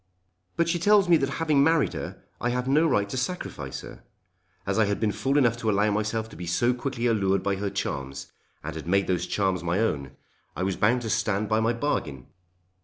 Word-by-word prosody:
"But 170 - +1
she 170 +1 0
tells 205 +1 +4
me 175 - +6
that 135 -2 -1
having 155 -4 +3
married 160 -1 +3
her - - -7 0.2
I 120 - 0
have 125 +1 -1
no 150 +5 +4
right 105 -8 +1
to 115 - -5
sacrifice 125 - -4
her. - - -12 0.6
As 100 +2 0
I 110 - +5
had 100 0 -1
been 110 -2 +1
fool 135 +6 0
enough 120 -5 +3
to 115 -2 -1
allow 105 +1 +2
myself 110 +2 -1
to - - -12
be 85 +2 -7
so 120 +9 +2
quickly 125 -1 -3
allured 100 -5 +2
by 100 0 0
her 100 +1 -2
charms, 70 -8 -4 0.3
and - - -5
had - - -7
made 100 +2 +2
those 90 -1 -1
charms 95 -4 0
my 85 +2 0
own, 70 - -1 0.4
I 90 - -2
was 95 -1 0
bound 120 +6 +2
to 110 - -3
stand 105 0 0
by 110 0 +2
my 115 +1 +2
bargain! 80 - -2
110 Hz, 220 wpm, -26 LUFS, 95-130 Hz, 0.6 s, me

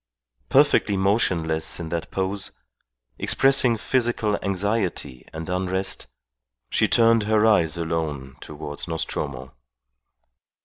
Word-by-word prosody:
Perfectly 135 -7 +3
motionless 90 -6 +1
in 85 -2 -5
that 85 0 -4
pose, 95 +1 -3 0.7
expressing 135 -3 +3
physical 115 -3 0
anxiety 95 - -2
and 80 0 -7
unrest, 95 +1 -2 0.6
she - - +3
turned 115 -1 +4
her 110 0 +4
eyes 85 -7 +3
alone 80 -5 -3
towards 75 0 -7
Nostromo. 70 -5 -4
95 Hz, 95 wpm, -23 LUFS, 80-110 Hz, 0.7 s, turned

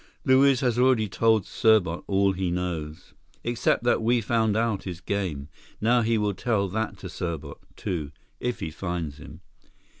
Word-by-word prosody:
Luiz 130 0 +5
has 125 -2 +1
already 125 -4 +4
told 110 +1 +2
Serbot 100 -7 +2
all 100 0 +3
he 95 -1 -2
knows." 85 -4 -4 0.3
"Except 120 0 +1
that 120 -1 +2
we 120 +2 +3
found 110 -1 +1
out 115 -3 0
his 90 -3 -5
game. 90 -9 -3 0.3
Now 120 +3 +3
he 115 0 +1
will 105 -1 0
tell 100 -1 0
that 105 0 -3
to 95 - -8
Serbot, 80 -5 -5 0.2
too—if 85 - -5
he 80 - -3
finds 85 -3 -4
him." - - -12
100 Hz, 155 wpm, -26 LUFS, 90-115 Hz, 0.3 s, Luiz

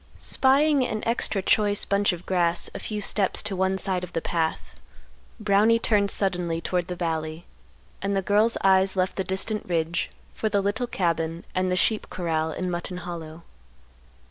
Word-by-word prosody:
Spying 280 +1 +3
an 215 -3 -3
extra 225 -4 +1
choice 205 0 +2
bunch 200 0 +2
of 175 -1 -7
grass 175 -2 +1
a - - -6
few 210 -1 -4
steps 195 -1 +2
to 210 -2 -2
one 190 +1 +1
side 190 -2 -1
of 180 - -8
the - - 0
path, 165 -1 -2 0.7
Brownie 215 +2 +4
turned 210 -3 +2
suddenly 180 -4 0
toward 175 +1 -2
the 180 - -4
valley; 160 -1 -3 0.6
and 200 +1 -1
the 195 - 0
girl's 210 +4 +2
eyes 190 0 +4
left 185 0 0
the 190 - -1
distant 195 +3 -2
ridge 170 0 -1 0.2
for 220 - -2
the 205 - +1
little 205 +5 -1
cabin 165 -4 -2
and 185 0 0
the - - +2
sheep 215 +3 +1
corral 160 -3 -1
in 180 +2 -3
Mutton 175 +1 -4
Hollow. 170 -2 -8
190 Hz, 170 wpm, -25 LUFS, 175-205 Hz, 0.7 s, Brownie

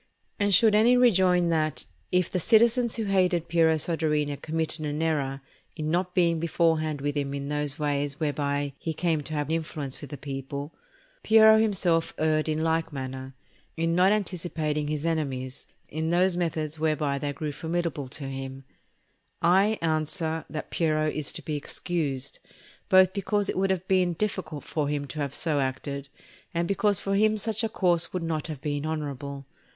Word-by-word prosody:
And 205 0 +2
should 215 +3 +6
any 230 +4 +5
rejoin 185 -7 +4
that, 155 -2 0 0.3
if 180 -1 +2
the 185 - -2
citizens 235 +4 +3
who 225 - -2
hated 185 -4 +1
Piero 165 -1 +3
Soderini 150 -2 0
committed 160 +1 -3
an 150 0 -2
error 140 -4 -1 0.3
in 155 -1 -3
not 180 +1 -1
being 170 -3 +3
beforehand 160 -3 +1
with 145 +1 -2
him 140 -1 -2
in 140 0 -4
those 150 -1 -1
ways 145 -1 -1
whereby 145 -2 -1
he 160 -1 -3
came 165 -2 0
to 155 +2 -6
have 150 +1 -2
influence 155 -4 -3
with 145 - -8
the 145 - -6
people, 140 +2 -6 0.5
Piero 220 0 +7
himself 185 -6 +1
erred 155 0 +1
in 155 +1 0
like 160 0 0
manner, 130 -1 -6 0.4
in 165 +1 +1
not 180 +3 +4
anticipating 165 -7 -1
his 150 +1 -2
enemies 135 -5 -2 0.2
in 160 +2 -3
those 180 +1 +3
methods 160 -3 -2
whereby 150 -3 0
they 145 +1 -2
grew 150 +1 -4
formidable 160 -2 -3
to 140 +2 -7
him; 135 0 -6 0.8
I 195 +5 +4
answer 160 +1 -1
that 155 - -6
Piero 155 -2 +1
is 150 -2 -1
to - - -6
be 155 - -3
excused, 145 -3 -2 0.5
both 185 0 +6
because 205 +1 0
it - - -8
would 195 +1 +1
have 185 -1 -1
been 185 -2 +2
difficult 155 -5 -3
for 150 -3 -2
him 145 -1 -2
to 155 - -6
have 140 -2 -2
so 155 -4 +1
acted, 140 +1 -3 0.5
and 170 0 0
because 200 +1 +2
for 195 - -2
him 215 +2 +3
such 220 +1 0
a 225 - 0
course 175 -5 +2
would 180 -2 -3
not 160 -2 -2
have 150 -5 -6
been 145 0 -2
honourable. 140 -3 -4
160 Hz, 175 wpm, -27 LUFS, 145-180 Hz, 0.8 s, Piero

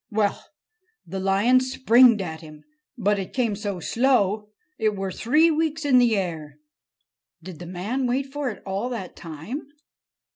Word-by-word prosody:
"Well, 210 -2 0 0.6
the 190 - -5
lion 200 +7 +3
springed 250 -4 +4
at 160 -3 -6
him. 155 -2 -13 0.3
But 205 -2 +1
it 190 - -6
came 235 -5 +1
so 200 -3 -4
slow, 215 -1 +1 0.3
it 215 -2 +1
were 195 -1 -3
three 305 - +3
weeks 315 -1 -1
in 260 -3 +5
the 235 -3 +3
air——" 160 -6 -4 0.9
"Did 175 -3 -9
the 175 - -8
man 210 +9 -2
wait 260 +3 0
for 290 -3 -2
it 215 - -9
all 195 +5 -2
that 215 -7 -6
time?" 170 - -7
210 Hz, 155 wpm, -24 LUFS, 190-255 Hz, 0.9 s, in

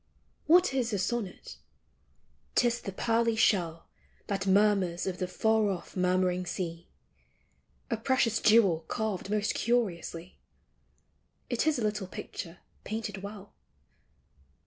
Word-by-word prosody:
What 350 -1 +5
is 250 -3 0
a - - +1
sonnet? 200 0 -3 1.0
'T - - +4
is 240 0 -1
the 195 - -5
pearly 230 +3 +1
shell 170 -7 +1 0.4
That 195 -1 -2
murmurs 195 -3 +3
of 185 -1 -3
the 185 - -1
far 220 +2 +2
off 185 -3 -5
murmuring 180 0 +1
sea; 170 -1 -4 1.0
A 230 - +1
precious 230 -1 +1
jewel 210 -7 +5
carved 215 -3 -3
most 210 0 0
curiously; 185 -7 -2 1.1
It - - 0
is 315 - +3
a 240 - -2
little 210 -2 -1
picture 175 -1 -8 0.2
painted 215 -2 -4
well. 200 0 -9
205 Hz, 125 wpm, -29 LUFS, 185-225 Hz, 1.1 s, What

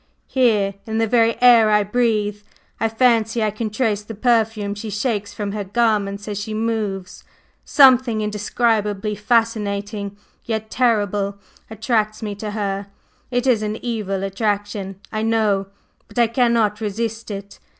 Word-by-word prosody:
Here, 215 -7 +2
in 220 0 -2
the 225 - +2
very 230 0 +2
air 235 -3 +7
I 210 -1 +4
breathe, 210 -2 0 0.4
I 225 - +1
fancy 225 -1 +2
I 215 - +1
can 215 +1 -3
trace 210 -2 0
the 215 +1 -9
perfume 220 -3 +1
she 210 +2 -6
shakes 205 -1 -2
from 205 -1 -4
her 210 0 -3
garments 205 -1 0
as 205 -1 -3
she 215 +1 -4
moves; 215 -4 -3 0.4
something 255 -5 +5
indescribably 210 0 0
fascinating 210 -2 -1 0.3
yet 220 -1 -4
terrible 205 -5 +1 0.3
attracts 220 -1 -1
me 210 -1 -3
to 210 +1 -6
her; 200 -1 -3 0.4
it 245 0 0
is 245 -5 +3
an 210 0 -2
evil 205 -5 -2
attraction, 200 -1 -2
I 215 - -2
know, 215 -3 +1 0.4
but - - -16
I 240 - +5
cannot 230 -3 +1
resist 220 +2 -3
it. 200 -1 -7
215 Hz, 145 wpm, -21 LUFS, 205-230 Hz, 0.4 s, air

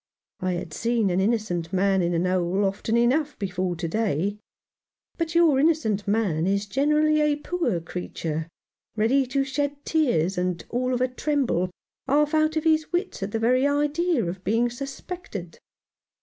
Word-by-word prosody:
I 185 0 -1
had 175 -2 -5
seen 230 -2 +1
an 180 - +1
innocent 190 -5 0
man 190 0 +2
in 170 0 +1
a - - +1
hole 185 +2 +1
often 200 +4 0
enough 275 +6 +2
before 185 -2 -2
to 170 0 -3
day; 200 0 -1 0.8
but 330 0 -2
your 325 -6 +5
innocent 240 -10 +1
man 195 -6 +1
is 200 +1 +1
generally 300 +6 +2
a 300 -1 +3
poor 315 - -1
creature, 160 -2 -4 0.5
ready 250 +5 +2
to 275 +2 +1
shed 285 +1 -3
tears, 195 - +1
and 180 -1 -2
all 250 +1 0
of 245 - -2
a 255 - +3
tremble, 255 - 0 0.4
half 295 +3 +2
out 310 0 +2
of 315 - 0
his 315 -1 +2
wits 355 - -2
at 195 +1 -3
the 225 - -1
very 250 +4 +3
idea 295 - +1
of 180 +2 -5
being 235 +3 +1
suspected. 270 - -7
230 Hz, 165 wpm, -25 LUFS, 185-290 Hz, 0.8 s, your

